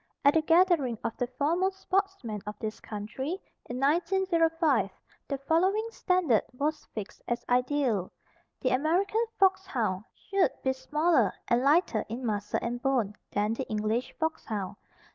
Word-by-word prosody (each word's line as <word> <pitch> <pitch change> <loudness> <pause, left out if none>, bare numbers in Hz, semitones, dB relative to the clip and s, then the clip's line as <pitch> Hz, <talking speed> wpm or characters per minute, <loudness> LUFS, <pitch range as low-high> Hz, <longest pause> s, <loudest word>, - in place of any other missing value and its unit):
At 285 - +6
a 320 - +5
gathering 325 -7 +3
of 225 - -2
the 245 - -1
foremost 340 +9 0
sportsmen 385 - -1
of 210 - -5
this 215 0 -5
country, 230 - -4 0.3
in 245 +1 -3
1905, 330 - +2 0.4
the 275 - -2
following 370 +10 +2
standard 365 - +2 0.2
was 305 +3 -1
fixed 210 -3 -6
as 240 - -2
ideal: 250 -6 +1 0.5
The 255 - +1
American 345 - +2 0.2
foxhound 275 - +2
should 395 -2 +1
be 265 - +2
smaller 300 - +2 0.2
and 240 +1 +4
lighter 280 - +3
in 240 +3 -4
muscle 210 -2 -1
and 240 +1 -3
bone, 245 -7 +1 0.2
than 210 +2 +1
the 260 +3 -4
English 215 +3 -1
foxhound. 215 - -2
270 Hz, 140 wpm, -29 LUFS, 230-340 Hz, 0.5 s, At